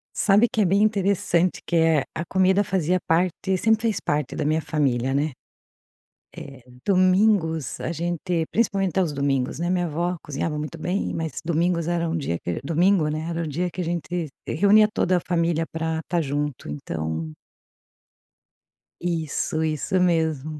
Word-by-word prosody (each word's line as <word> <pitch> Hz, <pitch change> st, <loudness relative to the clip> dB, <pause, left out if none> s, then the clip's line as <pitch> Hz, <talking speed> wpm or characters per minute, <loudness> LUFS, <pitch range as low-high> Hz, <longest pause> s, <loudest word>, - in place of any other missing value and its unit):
Sabe 210 Hz, +4 st, +4 dB
que 220 Hz, -4 st, +1 dB
é -, -, +4 dB
bem 195 Hz, +3 st, +3 dB
interessante, 195 Hz, -4 st, +1 dB
que, -, -, -2 dB
eh, 160 Hz, -3 st, +3 dB
a 165 Hz, -, -3 dB
comida 190 Hz, +2 st, +3 dB
fazia 185 Hz, -2 st, 0 dB
parte 180 Hz, +3 st, +1 dB
sempre 220 Hz, +3 st, +2 dB
fez 220 Hz, -4 st, +1 dB
parte 145 Hz, -3 st, -2 dB
da -, -, -2 dB
minha 155 Hz, +2 st, +1 dB
família, 135 Hz, -5 st, 0 dB
né, 145 Hz, +3 st, 0 dB, 1.0 s
eh, 135 Hz, -3 st, -10 dB, 0.2 s
domingos, 185 Hz, -, +2 dB
a 165 Hz, -, -3 dB
gente 170 Hz, 0 st, -2 dB
principalmente 195 Hz, -5 st, +1 dB
aos 170 Hz, -5 st, 0 dB
domingos, 140 Hz, -1 st, -1 dB
né, 175 Hz, -, -1 dB
a -, -, 0 dB
minha 180 Hz, -1 st, +1 dB
avó 170 Hz, +3 st, -2 dB
cozinhava 150 Hz, +2 st, -3 dB
muito 150 Hz, +2 st, -5 dB
bem, 180 Hz, +5 st, -2 dB
mas 160 Hz, -3 st, -3 dB
domingos 170 Hz, 0 st, +1 dB
era 170 Hz, -1 st, 0 dB
um 165 Hz, -, -1 dB
dia 85 Hz, -, -2 dB
que 85 Hz, -, -3 dB
domingo, 170 Hz, +2 st, +2 dB
né, 155 Hz, +1 st, -3 dB
era 170 Hz, 0 st, -2 dB
o 160 Hz, -, -4 dB
dia 175 Hz, +5 st, -2 dB
que 180 Hz, -, -5 dB
a -, -, -1 dB
gente 170 Hz, 0 st, -3 dB, 0.2 s
reunia 205 Hz, +5 st, +5 dB
toda 180 Hz, 0 st, +2 dB
a -, -, +1 dB
família 165 Hz, -2 st, 0 dB
para 160 Hz, 0 st, -2 dB
tá 175 Hz, +1 st, +1 dB
junto, 145 Hz, -2 st, -3 dB
então 80 Hz, +2 st, -4 dB, 1.7 s
Isso, 160 Hz, -2 st, -1 dB
isso 155 Hz, +4 st, -1 dB
mesmo. 160 Hz, -4 st, 0 dB
165 Hz, 165 wpm, -24 LUFS, 150-185 Hz, 1.7 s, reunia